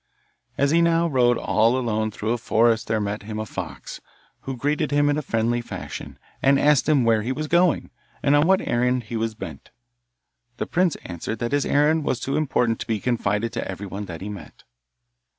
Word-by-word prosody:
As 140 +1 +2
he 170 +1 +4
now 170 0 +3
rode 125 -5 +3
all 115 +3 +2
alone 110 -3 -1
through 110 +1 -3
a 120 - 0
forest 115 0 +2
there 110 - 0
met 105 0 -3
him 105 +1 -6
a 110 - -3
fox, - - -7 0.4
who 135 -1 -6
greeted 150 +3 0
him 145 0 +3
in 145 - 0
a - - -2
friendly 120 -2 0
fashion, - - -8 0.2
and 140 0 +4
asked 150 0 +3
him 145 -5 +4
where 115 -2 +3
he 120 +4 -2
was 155 +3 -3
going, 175 0 +2 0.3
and 140 +1 +4
on 145 +2 +4
what 190 0 +2
errand 125 +1 +1
he 115 +2 -7
was 110 0 -2
bent. 80 -10 -9 0.9
The - - -2
prince 180 -2 +1
answered 90 +5 -5
that 120 +2 -3
his 145 -1 +1
errand 150 +2 +3
was 130 - -1
too 135 - -2
important 125 -6 +1
to - - -6
be 110 -2 -1
confided 115 -1 -1
to - - -3
everyone 100 +1 -5
that 85 -3 -8
he 100 - -5
met. 95 -8 -10
120 Hz, 205 wpm, -23 LUFS, 110-145 Hz, 0.9 s, he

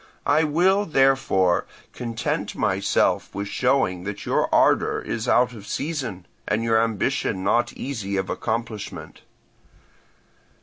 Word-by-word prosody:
I 150 +3 +3
will, 185 +7 +2
therefore, 135 - +2 0.3
content 115 -2 -3
myself - - +1
with 100 0 -3
showing 125 -9 +1
that 105 0 -5
your - - +1
ardour - - +3
is 115 +1 -4
out 125 0 +3
of 105 -3 -11
season, 135 - -4 0.2
and 110 +2 0
your 115 -1 +3
ambition 105 -4 -1
not 120 +4 +2
easy 105 -8 -4
of 95 0 -1
accomplishment. 110 -2 -4
115 Hz, 120 wpm, -23 LUFS, 100-135 Hz, 0.3 s, I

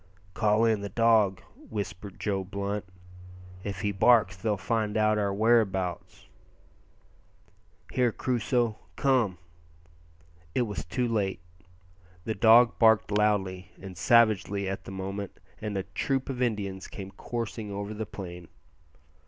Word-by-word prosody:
"Call 110 +1 +3
in 110 -3 +2
the 100 - -4
dog," 110 -3 +3
whispered 100 -2 -7
Joe 100 -2 -1
Blunt; 100 +1 -4 0.8
"if 100 -2 -5
he 105 -1 0
barks 105 -1 +4
they'll 105 +2 -1
find 105 +2 -1
out 110 0 +3
our 100 -1 0
whereabouts." 100 -4 0 1.6
"Here, 125 -2 +2
Crusoe, 120 -2 0 0.2
come 125 -9 +2 0.6
" 80 0 -30
It 125 - +3
was 105 -9 -4
too 120 +9 -1
late; 100 -6 -1 0.8
the 110 - -2
dog 115 +3 +5
barked 110 -3 +4
loudly 100 -3 0
and 95 -1 -9
savagely 100 0 +3
at 95 0 -4
the - - -8
moment, 95 +1 -5 0.2
and 105 -2 -3
a 95 - -1
troop 130 +8 -2
of 130 -1 -5
Indians 100 -5 -2
came 95 -1 -8
coursing 115 -2 -5
over 100 +1 -4
the 110 0 -5
plain. 90 -3 -8
105 Hz, 130 wpm, -28 LUFS, 95-110 Hz, 1.6 s, dog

